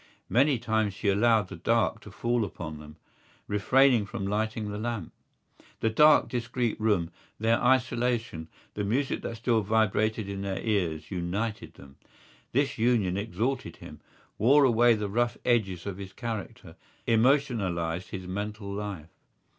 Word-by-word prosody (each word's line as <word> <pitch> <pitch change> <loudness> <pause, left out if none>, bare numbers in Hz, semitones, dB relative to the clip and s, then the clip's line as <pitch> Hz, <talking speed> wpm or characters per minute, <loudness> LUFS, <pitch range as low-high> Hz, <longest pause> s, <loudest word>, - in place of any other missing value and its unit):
Many 135 +2 +3
times 110 -3 -1
she 100 - -1
allowed 105 -1 +3
the - - -7
dark 115 +5 +1
to 105 - -12
fall 120 +3 0
upon 80 -6 -6
them, 75 0 -12 0.5
refraining 120 +2 +3
from 100 - -5
lighting 105 +1 -2
the 105 - -5
lamp. 115 -1 -4 0.7
The 110 - +1
dark 150 +7 +6
discreet 120 -1 -2
room, 100 -7 +1 0.3
their 115 +1 +2
isolation, 120 -8 +1 0.3
the 105 - -3
music 130 +7 -1
that 115 - -5
still 115 -1 +1
vibrated 110 0 +1
in 100 -1 -5
their 100 -1 -3
ears 90 -8 -1
united 100 +5 -3
them. 70 -1 -15 0.5
This 135 0 0
union 110 -6 +2
exalted 115 +5 -2
him, - - -12 0.4
wore 140 +7 +5
away 120 -2 +5
the 105 -1 -3
rough 120 +3 0
edges 95 -8 +1
of 100 -2 -5
his 95 -1 -8
character, 115 -2 -6 0.3
emotionalised 110 - +1
his 95 -2 -6
mental 100 +2 -5
life. 100 -6 -6
110 Hz, 145 wpm, -28 LUFS, 100-120 Hz, 0.7 s, dark